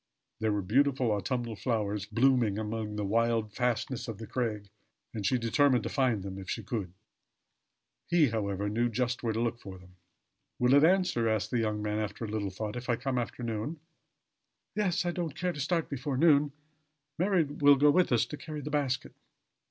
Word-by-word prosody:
There 110 Hz, 0 st, +1 dB
were 105 Hz, -1 st, -1 dB
beautiful 130 Hz, +3 st, +2 dB
autumnal 115 Hz, +3 st, -2 dB
flowers 105 Hz, -4 st, -2 dB
blooming 115 Hz, -2 st, +2 dB
amid 110 Hz, -1 st, -3 dB
the 105 Hz, -, -1 dB
wild 115 Hz, 0 st, +1 dB
fastnesses 125 Hz, +1 st, -1 dB
of 115 Hz, -3 st, -5 dB
the 110 Hz, -, -7 dB
crag, 110 Hz, -4 st, -3 dB, 0.5 s
and 110 Hz, -, -4 dB
she 125 Hz, -, +2 dB
determined 125 Hz, +2 st, +3 dB
to -, -, -3 dB
find 125 Hz, -8 st, +1 dB
them 95 Hz, 0 st, -6 dB
if 95 Hz, -, -9 dB
she -, -, -3 dB
could. 100 Hz, -7 st, -4 dB, 1.2 s
He, 165 Hz, -6 st, +4 dB
however 100 Hz, -3 st, -2 dB
knew 115 Hz, +4 st, +1 dB
just 125 Hz, +2 st, -1 dB
where 115 Hz, -, 0 dB
to 110 Hz, -, -2 dB
look 115 Hz, 0 st, -1 dB
for 95 Hz, -3 st, -9 dB
them. 90 Hz, 0 st, -18 dB, 0.6 s
"Will 125 Hz, +1 st, +3 dB
it 145 Hz, +1 st, +6 dB
answer," 170 Hz, -10 st, +3 dB
asked 110 Hz, -2 st, -1 dB
the 120 Hz, -, +1 dB
young 105 Hz, -2 st, -1 dB
man 105 Hz, 0 st, -1 dB
after 105 Hz, +1 st, -4 dB
a -, -, -5 dB
little 105 Hz, -1 st, -2 dB
thought, 105 Hz, +4 st, -5 dB
"if 125 Hz, +1 st, -6 dB
I 120 Hz, -, +3 dB
come 125 Hz, +1 st, -2 dB
after 120 Hz, +1 st, -5 dB
noon?" 115 Hz, +8 st, -3 dB, 0.9 s
"Yes 185 Hz, -4 st, 0 dB
I 175 Hz, -, +1 dB
don't 170 Hz, -5 st, -4 dB
care 180 Hz, 0 st, -1 dB
to 150 Hz, -, -8 dB
start 165 Hz, +3 st, 0 dB
before 140 Hz, -1 st, -3 dB
noon. 150 Hz, -1 st, +4 dB, 0.7 s
Mary 185 Hz, -1 st, +3 dB
will 145 Hz, -1 st, +4 dB
go 145 Hz, +2 st, +5 dB
with 180 Hz, 0 st, +3 dB
us 120 Hz, -, +3 dB
to 150 Hz, -, -7 dB
carry 155 Hz, -1 st, -6 dB
the 150 Hz, -, -6 dB
basket." 140 Hz, -3 st, -1 dB
120 Hz, 195 wpm, -30 LUFS, 105-140 Hz, 1.2 s, it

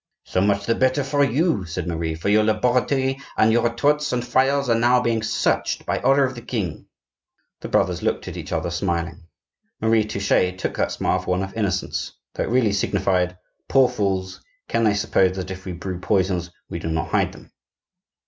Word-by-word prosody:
"So 90 Hz, -, -1 dB
much 100 Hz, 0 st, +1 dB
the 115 Hz, -, +2 dB
better 130 Hz, +3 st, +1 dB
for 145 Hz, +1 st, +1 dB
you," 140 Hz, -, +1 dB
said 85 Hz, -, -4 dB
Marie, 80 Hz, -1 st, -2 dB
"for 80 Hz, -, -5 dB
your 105 Hz, +1 st, +4 dB
laboratory, 125 Hz, +5 st, +1 dB, 0.2 s
and 110 Hz, -, +5 dB
your 120 Hz, -, +4 dB
retorts 145 Hz, +5 st, +1 dB
and 120 Hz, -1 st, -1 dB
phials 135 Hz, +2 st, +2 dB
are 120 Hz, -, +3 dB
now 120 Hz, +2 st, +4 dB
being 115 Hz, -2 st, 0 dB
searched 110 Hz, -, 0 dB
by -, -, -1 dB
order 135 Hz, +2 st, +4 dB
of 130 Hz, -1 st, 0 dB
the 120 Hz, -, -9 dB
king." 110 Hz, -8 st, -4 dB, 0.7 s
The -, -, -6 dB
brothers -, -, +1 dB
looked -, -, -1 dB
at -, -, -6 dB
each -, -, -7 dB
other 85 Hz, -, -1 dB
smiling. 85 Hz, -1 st, -3 dB, 0.5 s
Marie 110 Hz, -1 st, +3 dB
Touchet 100 Hz, -3 st, +1 dB
took -, -, -3 dB
that -, -, 0 dB
smile -, -, 0 dB
for -, -, -8 dB
one 90 Hz, +1 st, +1 dB
of 95 Hz, -, -6 dB
innocence, 100 Hz, -4 st, -2 dB, 0.2 s
though -, -, -2 dB
it -, -, -5 dB
really 115 Hz, -4 st, +2 dB
signified: 95 Hz, -2 st, 0 dB, 0.3 s
"Poor 135 Hz, -1 st, +5 dB
fools! 95 Hz, -4 st, -2 dB, 0.3 s
can 115 Hz, -, +1 dB
they 105 Hz, -2 st, +3 dB
suppose 95 Hz, -2 st, +2 dB
that 95 Hz, -1 st, -5 dB
if 95 Hz, 0 st, -8 dB
we 95 Hz, -, -4 dB
brew 90 Hz, +1 st, -5 dB
poisons, 90 Hz, -2 st, 0 dB, 0.2 s
we 85 Hz, -, -5 dB
do 80 Hz, -, -5 dB
not 80 Hz, 0 st, -2 dB
hide -, -, +1 dB
them?" -, -, -15 dB
105 Hz, 195 wpm, -22 LUFS, 90-125 Hz, 0.7 s, and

